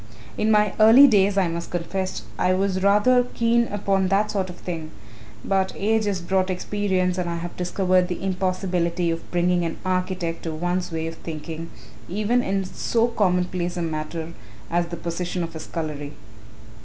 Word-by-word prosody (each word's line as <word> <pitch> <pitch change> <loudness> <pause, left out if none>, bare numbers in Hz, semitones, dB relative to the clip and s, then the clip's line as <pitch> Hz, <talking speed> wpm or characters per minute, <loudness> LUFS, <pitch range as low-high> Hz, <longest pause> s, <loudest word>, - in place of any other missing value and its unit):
"In 215 - 0
my 210 -2 +4
early 225 +6 +9
days, 200 -5 +4
I 190 -2 +3
must 170 0 -4
confess, 185 +2 -3 0.2
I 185 0 +3
was 190 0 0
rather 210 +6 +5
keen 235 0 +3
upon 195 -2 0
that 200 +3 +2
sort 190 -3 -1
of 180 - -8
thing, 165 -3 -6 0.6
but 190 -1 +1
age 220 +2 +1
has 195 -3 -1
brought 185 +2 0
experience 185 -1 0
and 175 -1 -1
I 170 - -2
have 170 +1 -6
discovered 180 0 +1
the 180 +1 -5
impossibility 180 -2 0
of 165 0 -5
bringing 175 0 +1
an 165 -1 -3
architect 185 -2 -1
to 165 - -4
one's 175 +2 -2
way 160 0 -2
of 165 0 -5
thinking 165 +1 -6 0.4
even 215 +6 +1
in 195 -3 -1
so 230 +5 0
commonplace 180 -4 0
a 175 - -1
matter 160 +1 -4 0.4
as 170 0 +1
the 170 0 -6
position 175 +1 -3
of 165 0 -6
a - - -5
scullery. 150 -3 -5
185 Hz, 170 wpm, -24 LUFS, 170-195 Hz, 0.6 s, early